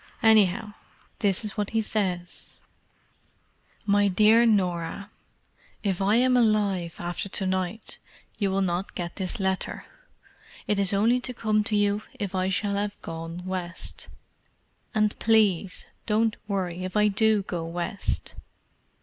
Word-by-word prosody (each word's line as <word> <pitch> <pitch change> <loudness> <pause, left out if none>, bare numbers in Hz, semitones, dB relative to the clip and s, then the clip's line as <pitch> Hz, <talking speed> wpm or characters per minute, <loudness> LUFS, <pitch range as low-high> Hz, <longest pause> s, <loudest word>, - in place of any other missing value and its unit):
Anyhow, 215 -1 +4 0.5
this 200 0 +1
is 210 - -5
what 205 -1 -1
he - - +4
says: 180 -5 -2 1.3
"My 205 0 +4
Dear 215 +5 +5
Norah,— 190 -1 0 0.7
"If 195 -3 0
I 200 +3 +3
am 250 +1 +4
alive 205 -7 +2
after 175 +3 -4
to 190 - -1
night 185 +3 -3 0.4
you 200 -3 +1
will 195 +1 +1
not 180 +1 -2
get 170 -1 -5
this 190 0 -2
letter: 190 -1 -2 0.8
it 210 - 0
is 195 0 +2
only 220 +5 +3
to 250 0 -5
come 215 -2 +1
to 215 - 0
you 205 0 +2 0.2
if 200 -3 -3
I 185 0 0
shall 200 +1 0
have 205 0 -2
'gone 165 +2 -6
West.' 185 -2 -5 0.9
And 215 -1 +3
please 205 -5 +2 0.2
don't 220 0 +2
worry 185 -3 -2
if 185 +2 -3
I 210 0 +5
do 210 0 +3
go 175 -3 -4
West. 175 +4 -3
200 Hz, 140 wpm, -26 LUFS, 185-215 Hz, 1.3 s, Dear